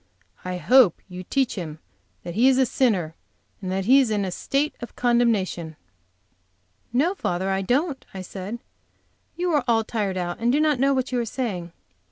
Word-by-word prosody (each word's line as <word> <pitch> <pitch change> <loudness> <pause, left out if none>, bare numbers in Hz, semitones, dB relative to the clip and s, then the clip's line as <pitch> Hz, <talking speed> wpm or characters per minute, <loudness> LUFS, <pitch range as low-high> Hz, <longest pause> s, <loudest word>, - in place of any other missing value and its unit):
I 180 0 -3
hope 245 -1 +5
you 180 -1 -8
teach 265 +6 0
him 160 -6 -6 0.5
that 175 - -6
he 235 +7 +4
is 265 -1 +4
a 265 - +4
sinner, 205 -11 +1 0.5
and 185 -2 -4
that 190 0 -1
he 265 +5 +6
is 260 -4 +2
in 205 -2 0
a 185 - -3
state 280 +10 -1
of 240 - -8
condemnation." 220 -9 +1 1.2
"Now, 290 +10 +2
father, 190 - -1
don't," 270 - 0
I 190 -1 -7
said. 195 +4 -6 0.8
"You 355 0 -1
are 295 -4 +2
all 225 -1 +3
tired 205 -4 -2
out, 175 -1 -3
and 235 +1 +2
do 285 - +2
not 305 -4 +2
know 275 +1 +3
what 260 0 -1
you 250 - 0
are - - 0
saying. 205 -8 -4
230 Hz, 185 wpm, -24 LUFS, 185-265 Hz, 1.2 s, he